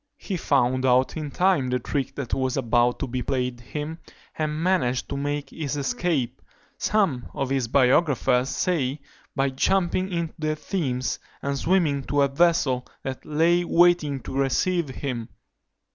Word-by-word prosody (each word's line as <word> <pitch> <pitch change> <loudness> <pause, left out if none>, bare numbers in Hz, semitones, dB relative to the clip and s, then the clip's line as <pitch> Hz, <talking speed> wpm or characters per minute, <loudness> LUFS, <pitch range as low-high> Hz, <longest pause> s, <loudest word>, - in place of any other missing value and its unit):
He 195 - -4
found 130 -5 +1
out 130 0 +3
in 155 -2 -4
time 175 -5 +2
the 125 - +1
trick 135 +2 -3
that 135 -4 -5
was 130 0 0
about 120 -1 +2
to 140 - -3
be 125 +1 -3
played 125 -2 -2
him, 150 +6 -5 0.4
and 155 0 -2
managed 170 -10 +1
to - - -3
make 145 0 -3
his 145 -3 -3
escape; 135 -2 -1 0.4
some 190 - +1
of 135 -1 -2
his 135 -3 +1
biographers 130 0 +3
say, 145 -6 0 0.4
by 135 -1 +1
jumping 185 +6 +1
into 170 -2 -2
the 155 0 0
Thames, 130 - -2 0.2
and 140 0 -1
swimming 155 -2 +2
to 145 -1 +2
a - - +4
vessel 140 -4 +2 0.2
that 130 -1 -5
lay 165 +3 +3
waiting 170 -5 +3
to - - -8
receive 150 +4 +1
him. 125 -3 -4
140 Hz, 155 wpm, -25 LUFS, 130-165 Hz, 0.4 s, a